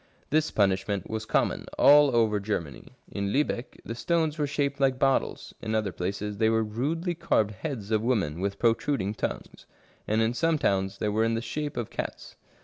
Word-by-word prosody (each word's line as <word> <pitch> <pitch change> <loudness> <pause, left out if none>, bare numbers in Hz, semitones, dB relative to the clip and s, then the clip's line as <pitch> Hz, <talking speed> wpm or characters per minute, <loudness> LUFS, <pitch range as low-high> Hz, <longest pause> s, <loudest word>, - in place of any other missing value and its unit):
This 155 +1 +2
punishment 100 -1 0
was 110 0 -3
common - - +1
all 145 -3 +7
over 110 -3 +3
Germany. 95 -8 -4 0.2
In 100 0 -2
Liibeck 135 -2 -1
the 115 - -4
stones 155 +6 0
were 145 - +1
shaped 140 -1 -1
like 135 -2 +2
bottles, 135 0 0
in 110 0 -2
other 110 -3 0
places 100 +3 -4
they 110 -1 +4
were 110 0 +2
rudely 150 - -2
carved 110 -10 +1
heads 110 -2 -5
of 110 -1 +2
women 100 -10 0
with 100 0 -2
protruding 115 -3 +1
tongues; - - -5 0.4
and 110 +1 +1
in 115 +1 +1
some 165 +5 +1
towns 95 -6 0
they 105 - -1
were 110 +2 +1
in 115 0 +1
the - - 0
shape 145 +3 -4
of 120 -3 -3
cats. - - -6
110 Hz, 185 wpm, -27 LUFS, 100-140 Hz, 0.4 s, all